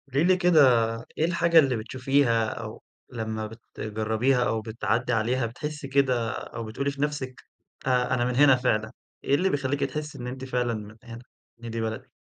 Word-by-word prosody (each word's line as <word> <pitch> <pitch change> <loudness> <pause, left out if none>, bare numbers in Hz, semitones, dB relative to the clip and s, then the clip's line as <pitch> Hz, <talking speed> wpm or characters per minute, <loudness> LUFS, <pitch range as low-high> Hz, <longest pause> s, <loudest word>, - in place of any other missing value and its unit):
قولي 140 +3 +1
لي 185 +1 +4
كده 180 -3 +4 0.6
إيه 155 - +2
الحاجة 170 -1 +4
اللي 135 -5 +3
بتشوفيها 125 0 +1
أو - - -7 0.3
لمّا 110 -2 -3
بتجربيها 110 +3 -1
أو 110 -2 0
بتعدّي 110 +2 -1
عليها 120 +3 +1
بتحسي 150 +5 -5
كده 130 -4 +2
أو 115 - -6
بتقولي 125 +6 -2
في 140 0 -8
نَفسك 145 -4 -3 0.4
أ 125 -1 +2
أنا 120 -1 +1
من 125 0 -1
هنا 140 0 +7
فعلًا، 110 -3 0 0.3
إيه 140 - +3
اللي 185 +6 +2
بيخلّيكِ 140 -2 -1
تحسي 150 -1 -4
إن 125 -1 -6
أنتِ 130 +1 -6
فعلًا 125 -2 -1
من 105 0 -7
هنا، 115 -1 -9 0.4
إن 115 - -5
دي 115 0 -3
بلدِك 110 0 -4
125 Hz, 175 wpm, -26 LUFS, 115-140 Hz, 0.6 s, هنا